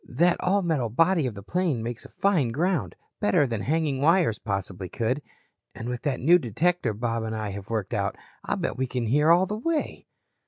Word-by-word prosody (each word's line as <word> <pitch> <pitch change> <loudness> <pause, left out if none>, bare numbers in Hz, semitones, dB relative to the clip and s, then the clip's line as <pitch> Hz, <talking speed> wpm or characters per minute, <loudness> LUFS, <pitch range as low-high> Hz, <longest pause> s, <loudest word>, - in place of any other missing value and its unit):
That 170 +7 +3
all 195 +2 +1
metal 150 -9 0
body 165 - +3
of 115 - -5
the 100 - -9
plane 160 - -1
makes 120 0 -5
a - - -11
fine 180 -11 +1
ground, 145 - -1 0.2
better 105 +8 +3
than 115 -5 -3
hanging 145 0 0
wires 160 - +3
possibly 95 -3 -4
could. 125 +5 -1 0.5
And 115 - -6
with 125 -1 -3
that 140 -3 -1
new 170 +7 +5
detector 160 - 0
Bob 115 +1 -1
and 110 0 -3
I 110 -1 -3
have 100 0 -7
worked 110 -4 -2
out, - - -1 0.3
I'll - - -1
bet - - -2
we 130 0 0
can 125 -1 -2
hear 150 +7 +3
all 175 +3 +6
the 210 +3 -4
way." 315 +4 -2
130 Hz, 205 wpm, -26 LUFS, 115-170 Hz, 0.5 s, all